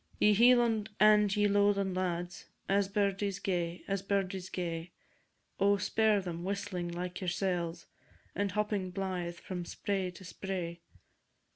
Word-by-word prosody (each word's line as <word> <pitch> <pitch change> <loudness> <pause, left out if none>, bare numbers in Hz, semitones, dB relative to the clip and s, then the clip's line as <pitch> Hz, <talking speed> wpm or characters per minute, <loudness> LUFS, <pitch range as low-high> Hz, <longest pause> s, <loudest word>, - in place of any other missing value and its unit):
Ye 210 - +5
Hieland 230 -1 +4
and 210 -1 +5
ye 210 0 +3
Lowland 200 -2 +2
lads, 175 -1 -3 0.2
As 200 0 +2
birdies 200 -1 0
gay, 175 -3 -2
as 195 -1 -1
birdies 195 -2 -1
gay, 170 -1 -4 0.7
Oh, 200 +1 +4
spare 210 +2 +2
them, 175 -2 -5
whistling 195 -2 -3
like 180 +2 -5
yoursel's, 175 -2 -1 0.5
And 200 0 -1
hopping 210 -3 -1
blythe 180 -2 -3
from 180 -1 -5
spray 190 +1 -2
to 180 +1 -12
spray! 175 -2 -5
190 Hz, 130 wpm, -32 LUFS, 180-205 Hz, 0.7 s, Ye